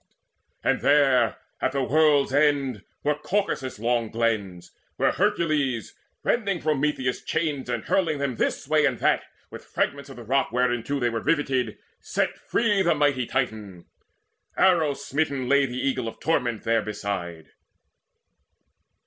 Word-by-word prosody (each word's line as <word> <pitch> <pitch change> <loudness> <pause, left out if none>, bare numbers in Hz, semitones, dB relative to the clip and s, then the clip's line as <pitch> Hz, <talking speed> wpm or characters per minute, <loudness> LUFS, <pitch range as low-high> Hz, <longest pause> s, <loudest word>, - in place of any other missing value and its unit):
And - - +1
there, 135 -5 +4 0.2
at 130 - 0
the 140 -1 0
world's 145 -1 +3
end, 140 -7 +2 0.2
Were 150 - +2
Caucasus' 150 - -2
long 115 0 0
glens, 105 -6 -2 0.2
where - - +2
Hercules, 155 - 0 0.3
Rending 200 -6 0
Prometheus' 150 -4 0
chains, 145 -6 -2
and 120 -2 -2
hurling 165 -6 +1
them 140 -4 -2
This - - -1
way 155 -1 +4
and 130 -3 -1
that - - +2 0.3
with - - -9
fragments 140 -1 -2
of 135 - -10
the 120 - -9
rock 135 +3 +1
Whereinto 125 +2 0
they 120 -2 +1
were 115 -1 -2
riveted, 135 -6 0 0.2
set - - -1
free 210 -4 +1
The 170 -3 +3
mighty 145 -5 +1
Titan. 110 -9 -3 0.7
Arrow 165 -6 +3
smitten 140 -2 -2
lay 140 +1 +4
The 125 0 -6
Eagle 130 -2 -1
of 115 - -5
the - - -16
Torment 125 -8 0
therebeside. 100 -7 -2
135 Hz, 140 wpm, -25 LUFS, 120-150 Hz, 0.7 s, there